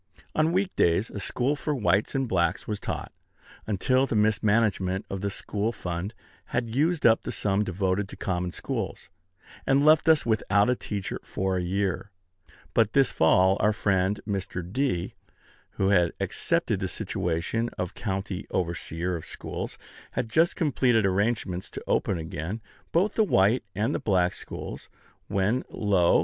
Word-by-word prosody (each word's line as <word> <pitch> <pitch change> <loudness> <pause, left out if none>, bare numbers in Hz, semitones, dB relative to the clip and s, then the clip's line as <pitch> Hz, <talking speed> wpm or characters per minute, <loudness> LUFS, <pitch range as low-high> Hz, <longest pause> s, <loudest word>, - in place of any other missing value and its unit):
On 155 +1 +2
week 190 +2 0
days 85 +6 +2
a 105 - -5
school 130 +7 +1
for 150 +1 -2
whites 100 0 +1
and 135 -1 +1
blacks 85 -6 0
was 105 -2 -2
taught, - - -4 0.6
until 130 +6 +2
the 115 - -2
mismanagement 105 -3 +2
of 95 -1 -3
the 100 - -1
school 105 +2 -2
fund 90 0 -4 0.3
had 115 -2 -2
used 155 +5 +1
up 115 -1 +6
the - - -4
sum 100 0 +1
devoted 95 +1 -1
to - - -8
common 90 -1 -2
schools, - - -5 0.6
and 140 +2 +4
left 155 +1 +6
us 160 -2 +5
without 105 -1 +2
a - - +2
teacher 100 -5 -4
for 95 -1 -2
a - - 0
year. 95 +2 -1 0.6
But 110 -2 +3
this 135 -2 +4
fall 95 +4 +4
our 105 0 +3
friend 100 -1 +1
Mr. 95 -3 -3
D., 130 -10 0 0.6
who 95 - +1
had 90 -4 +3
accepted - - 0
the - - -1
situation 90 +8 -2
of 90 -1 -3
county 95 -2 -4
overseer 85 0 -2
of 80 - -5
schools, - - -5 0.4
had 115 -2 -2
just 165 +7 +3
completed 125 - +2
arrangements 95 -2 0
to - - -8
open 95 - +1
again 80 +5 -4 0.3
both 190 +5 +2
the 220 - +3
white 110 - +3
and 105 +4 0
the - - -1
black 90 -4 +2
schools, - - -7 0.4
when, 105 +6 +1
lo! 95 -5 +3
100 Hz, 160 wpm, -27 LUFS, 95-120 Hz, 0.6 s, up